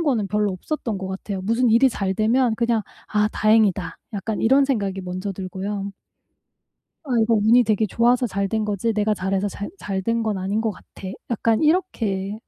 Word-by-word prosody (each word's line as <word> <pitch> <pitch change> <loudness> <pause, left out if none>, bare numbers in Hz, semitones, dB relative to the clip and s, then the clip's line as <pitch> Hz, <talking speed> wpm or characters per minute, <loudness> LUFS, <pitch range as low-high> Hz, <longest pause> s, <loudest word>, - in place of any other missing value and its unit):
그런 - - 0
거는 245 -10 +1
별로 210 0 +1
없었던 225 - -4
것 190 0 -5
같아요. 190 0 -5
무슨 230 +5 +2
일이 235 +4 +5
잘 195 -4 -2
되면 230 +3 +2
그냥 235 -2 +1 0.3
'아 210 0 +2
다행이다.' 210 -5 +2 0.2
약간 205 +2 -3
이런 270 +5 +4
생각이 200 -8 -1
먼저 185 +2 -4
들고요. 195 +2 -5 1.1
'아 295 - -12
이거 225 +1 +2
운이 225 +3 +5
되게 215 -1 +1
좋아서 240 +4 +2
잘된 200 +2 -1
거지, 210 +2 -1
내가 210 0 +1
잘해서 195 +1 -1
잘 200 +1 -6
잘 195 -2 -3
된 230 +3 0
건 215 -3 -1
아닌 195 +4 -1
것 225 - 0
같아.' 190 0 -12 0.2
약간 225 0 +1
이렇게 215 - 0
210 Hz, 345 characters per minute, -22 LUFS, 195-230 Hz, 1.1 s, 일이